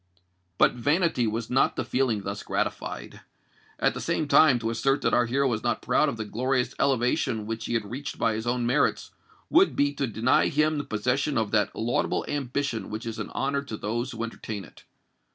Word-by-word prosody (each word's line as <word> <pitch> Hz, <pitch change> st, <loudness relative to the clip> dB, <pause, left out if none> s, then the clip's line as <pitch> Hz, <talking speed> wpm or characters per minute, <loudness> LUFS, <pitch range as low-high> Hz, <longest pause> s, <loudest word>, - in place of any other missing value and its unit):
But -, -, +5 dB
vanity 145 Hz, 0 st, +1 dB
was 115 Hz, +2 st, -3 dB
not 130 Hz, -, +3 dB
the -, -, -2 dB
feeling 120 Hz, -6 st, 0 dB
thus 100 Hz, +1 st, -4 dB
gratified: -, -, -4 dB, 0.6 s
at -, -, +2 dB
the -, -, -6 dB
same 155 Hz, -, -1 dB
time, 140 Hz, -3 st, +6 dB
to 115 Hz, -1 st, -2 dB
assert 135 Hz, +5 st, +1 dB
that -, -, +1 dB
our 120 Hz, -1 st, +3 dB
hero 135 Hz, +3 st, +1 dB
was 110 Hz, -4 st, -1 dB
not 120 Hz, -1 st, -1 dB
proud 150 Hz, -, +3 dB
of 120 Hz, -, -5 dB
the 110 Hz, -, -4 dB
glorious 125 Hz, +3 st, -1 dB
elevation 125 Hz, -4 st, +1 dB
which 115 Hz, 0 st, -4 dB
he 120 Hz, -, -2 dB
had 110 Hz, -2 st, 0 dB
reached 135 Hz, +8 st, -6 dB
by 115 Hz, -, +1 dB
his 110 Hz, +2 st, -4 dB
own 120 Hz, 0 st, 0 dB
merits, 125 Hz, +5 st, +1 dB, 0.4 s
would 370 Hz, +3 st, +5 dB
be 145 Hz, 0 st, +2 dB
to 140 Hz, -1 st, -2 dB
deny 115 Hz, +3 st, +2 dB
him 150 Hz, +1 st, +1 dB
the -, -, -2 dB
possession 125 Hz, +7 st, 0 dB
of 110 Hz, -2 st, 0 dB
that 105 Hz, -2 st, +1 dB
laudable 115 Hz, +2 st, 0 dB
ambition 140 Hz, -3 st, -2 dB
which 110 Hz, +2 st, -5 dB
is 115 Hz, -1 st, -5 dB
an -, -, -4 dB
honour 140 Hz, +1 st, -1 dB
to 125 Hz, -6 st, -7 dB
those 115 Hz, +4 st, -3 dB
who 115 Hz, -1 st, -4 dB
entertain 110 Hz, -3 st, -6 dB
it. -, -, -18 dB
120 Hz, 205 wpm, -26 LUFS, 115-140 Hz, 0.6 s, time